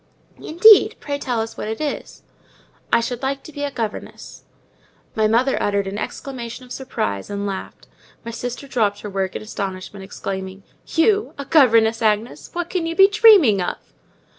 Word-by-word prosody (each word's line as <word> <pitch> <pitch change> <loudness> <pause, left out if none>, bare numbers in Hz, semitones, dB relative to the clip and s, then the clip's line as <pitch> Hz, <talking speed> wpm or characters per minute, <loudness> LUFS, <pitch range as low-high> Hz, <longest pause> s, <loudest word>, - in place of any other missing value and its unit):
"Indeed! 400 +6 +6
pray 285 -1 -4
tell 245 -5 -1
us 225 0 -6
what - - -5
it 220 +1 -4
is." 300 -2 -5 0.7
"I - - +4
should 240 +1 -4
like 270 0 -2
to - - -11
be 290 -1 -6
a 285 - -1
governess." 230 -6 -6 0.7
My 220 -1 +2
mother 245 +5 +2
uttered 200 -1 0
an 195 +2 -5
exclamation 255 -1 -6
of 250 - -18
surprise, 100 - -4
and 200 0 -3
laughed. 195 -1 -6 0.4
My 230 - -5
sister 245 +4 -6
dropped 210 -6 0
her 210 - -7
work 190 -1 -2
in - - -5
astonishment, 195 -1 -6
exclaiming, 190 0 -6 0.2
"You 410 +6 +1
a 280 - -6
governess, 230 -7 +4
Agnes! 215 +1 -1
What 350 0 -4
can 345 -3 -1
you 330 - -3
be 390 +1 +7
dreaming 405 - +6
of?" 175 - -2
235 Hz, 170 wpm, -21 LUFS, 205-285 Hz, 0.7 s, be